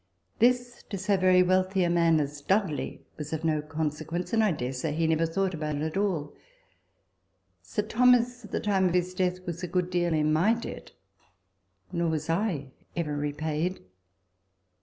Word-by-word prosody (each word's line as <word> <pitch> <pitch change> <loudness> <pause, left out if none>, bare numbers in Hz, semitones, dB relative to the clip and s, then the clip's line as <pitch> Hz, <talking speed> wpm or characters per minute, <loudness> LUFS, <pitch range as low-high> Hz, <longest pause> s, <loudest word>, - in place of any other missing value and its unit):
This 245 +1 +2
to 200 - -3
so 200 +2 +1
very 185 -1 +5
wealthy 185 +1 +2
a 175 - +2
man 165 -2 +4
as 145 0 -3
Dudley 190 -4 -1
was 150 0 -6
of 160 0 -3
no 155 -2 +1
consequence; 155 +4 -3
and 225 -1 +4
I 210 - +3
dare 130 -5 -3
say 140 +4 -2
he 165 +1 0
never 160 +1 +2
thought 190 +3 -1
about 155 -2 -3
it 145 - -2
at 160 +2 -3
all. 185 -8 -1 1.3
Sir 95 - -2
Thomas 245 +2 +3
at 210 - -11
the - - -1
time 195 -3 +2
of 180 - 0
his 180 0 +1
death 185 0 -1
was 175 0 -5
a 180 - -3
good 180 +1 -1
deal 175 -1 +1
in 155 0 +2
my 190 +9 +4
debt; 230 - -7 1.0
nor 170 -1 0
was 155 0 -1
I 165 -7 -1 0.2
ever 155 -4 -2
repaid. 150 +4 -2
175 Hz, 180 wpm, -28 LUFS, 155-190 Hz, 1.3 s, very